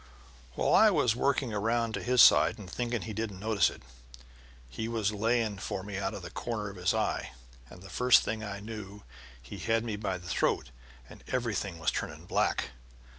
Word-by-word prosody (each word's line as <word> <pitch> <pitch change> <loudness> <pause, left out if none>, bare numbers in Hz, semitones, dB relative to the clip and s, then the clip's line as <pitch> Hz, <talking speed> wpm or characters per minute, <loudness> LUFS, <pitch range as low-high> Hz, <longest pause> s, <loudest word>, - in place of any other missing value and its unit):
While - - +1
I - - +7
was 115 -2 +2
working 130 -2 0
around 115 +2 0
to - - -3
his 125 0 +5
side - - +6
and 105 -4 -10
thinking 120 +3 -3
he 110 - -6
didn't 105 -3 -4
notice 105 -3 +2
it, - - -12 0.8
he 110 - -5
was 110 -3 0
laying 110 -1 0
for 95 - -4
me 100 -1 -5
out 100 +1 -2
of 95 - -8
the 85 - -8
corner 105 -3 -4
of - - -13
his 90 0 +1
eye, - - -1 0.4
and 90 - -13
the 95 - -11
first 125 +2 +5
thing 110 0 -3
I 100 -1 -5
knew 105 -2 -8 0.4
he 60 - -10
had 115 0 +1
me 110 -3 -3
by 100 -3 -2
the 90 0 -12
throat 60 - 0 0.4
and - - -14
everything 105 -7 -2
was 80 - 0
turning - - -5
black. - - 0
105 Hz, 195 wpm, -30 LUFS, 100-115 Hz, 0.8 s, I